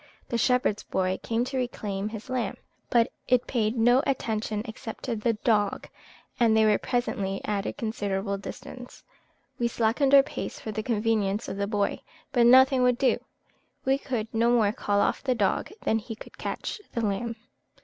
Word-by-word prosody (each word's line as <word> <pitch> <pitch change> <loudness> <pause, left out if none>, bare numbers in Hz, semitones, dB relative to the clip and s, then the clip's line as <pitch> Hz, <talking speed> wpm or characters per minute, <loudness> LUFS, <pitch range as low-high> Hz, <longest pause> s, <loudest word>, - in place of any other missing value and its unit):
The 235 - 0
shepherd's 250 -4 +2
boy 185 0 -1
came 230 +1 0
to 265 +1 -4
reclaim 210 -5 -3
his 220 +1 -8
lamb; 250 -6 -2 0.3
but 235 -1 +3 0.2
it 250 0 +3
paid 230 -1 0
no 245 +3 +5
attention 220 -5 -1
except 220 0 -8
to 245 -3 -1
the 230 +2 +1
dog, 210 -2 0 0.5
and 225 -2 +4
they 220 - +5
were 210 -1 +4
presently 200 -6 -1
at 205 -1 -1
a - - -3
considerable 200 -3 -2
distance. 245 +4 -9 0.6
We 235 - +2
slackened 240 +5 +2
our 275 - +9
pace 290 - -6
for 220 - -5
the 215 - -3
convenience 215 -2 0
of - - -5
the 200 0 -1
boy, 205 -1 -1 0.3
but 240 -3 +4
nothing 260 +1 +7
would 250 -1 +3
do; 265 0 +2 0.7
we 270 +1 +2
could 245 -6 -3
no 230 +1 +3
more 225 -4 +4
call 205 -1 0
off - - +1
the 260 -2 +1
dog 200 -4 0
than 225 - +2
he 225 +1 -7
could - - -13
catch 415 - -4
the 235 - -1
lamb. 230 +3 -2
225 Hz, 180 wpm, -27 LUFS, 210-245 Hz, 0.7 s, our